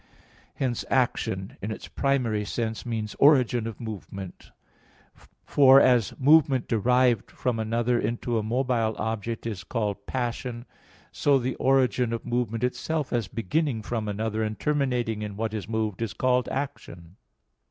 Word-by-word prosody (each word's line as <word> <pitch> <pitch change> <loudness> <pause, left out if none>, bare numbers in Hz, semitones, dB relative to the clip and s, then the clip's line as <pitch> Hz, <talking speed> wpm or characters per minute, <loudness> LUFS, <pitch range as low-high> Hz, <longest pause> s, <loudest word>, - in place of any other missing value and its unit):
Hence 125 -4 -1
action, 100 -7 0
in 100 - -3
its 110 - -6
primary 125 -7 0
sense, 110 +2 -3
means 110 -3 -3
origin 125 -5 +4
of 115 - -7
movement; 100 -4 -8 1.0
for, 135 -1 +7
as 125 -6 +3
movement 135 -2 +4
derived 120 +1 +2
from 120 -3 -2
another 115 +2 +1
into 115 +1 -1
a - - -1
mobile 115 -1 0
object, 110 +1 -3
is 105 -5 -4
called 105 -3 -3
"passion," 120 -1 -3 0.5
so 140 -1 +3
the 130 0 -1
origin 130 -3 +2
of 115 - -4
movement 120 -2 -1
itself 150 +4 -2
as 115 -5 0
beginning 115 - -1
from 110 -1 -3
another 110 +1 -2
and 110 -1 -3
terminating 125 -7 0
in 105 -1 -5
what 110 0 -2
is 110 0 -5
moved, 110 -2 -2
is 115 -3 -2
called 125 -1 +1
"action." 95 -11 -6
115 Hz, 140 wpm, -26 LUFS, 110-130 Hz, 1.0 s, for